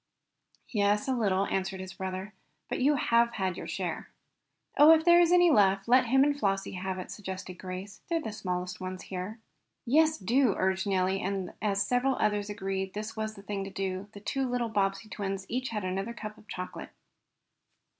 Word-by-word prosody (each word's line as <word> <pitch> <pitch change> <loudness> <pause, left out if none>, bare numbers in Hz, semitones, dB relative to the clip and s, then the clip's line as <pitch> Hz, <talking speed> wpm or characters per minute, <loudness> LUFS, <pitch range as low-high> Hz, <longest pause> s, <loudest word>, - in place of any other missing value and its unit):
"Yes, 210 +2 +1
a 265 - +2
little," 200 -5 +1
answered 190 -1 -2
his 185 0 -7
brother 190 +2 -5 0.4
"But - - -2
you 285 +3 +4
have 235 -2 +3
had 190 -3 -1
your - - -7
share." - - -4 0.7
"Oh, 295 +2 +8
if 320 0 +2
there 345 0 +7
is 345 0 +4
any 355 -1 +6
left 195 -5 +4
let 250 +1 +5
him 265 +3 +5
and 290 0 +2
Flossie 195 -7 -1
have 185 0 -4
it," 185 - -6
suggested 190 -3 -7
Grace. 185 +2 -7
"They're 335 -1 +1
the 255 -9 -5
smallest 180 -3 -4
ones 185 0 -5
here." 190 +4 -5 0.5
"Yes, 310 +5 +4
do," 235 +2 +2
urged 190 +1 0
Nellie, 190 0 +1
and 190 -1 -3
as 200 -2 +1
several 255 +2 +2
others 210 0 0
agreed 195 -2 -2
that 190 - -17
this 215 +1 -5
was 215 0 -3
the 200 - -12
thing 200 -1 -3
to 195 - -6
do, 190 0 -3
the 205 - -9
two 265 +5 -2
little 245 -1 -1
Bobbsey 195 0 0
twins 195 -1 -4
each 255 +2 -2
had 210 -3 -3
another 195 +5 -3
cup 215 -2 -7
of 215 - -19
chocolate. 180 -1 -6
200 Hz, 195 wpm, -29 LUFS, 190-235 Hz, 0.7 s, Oh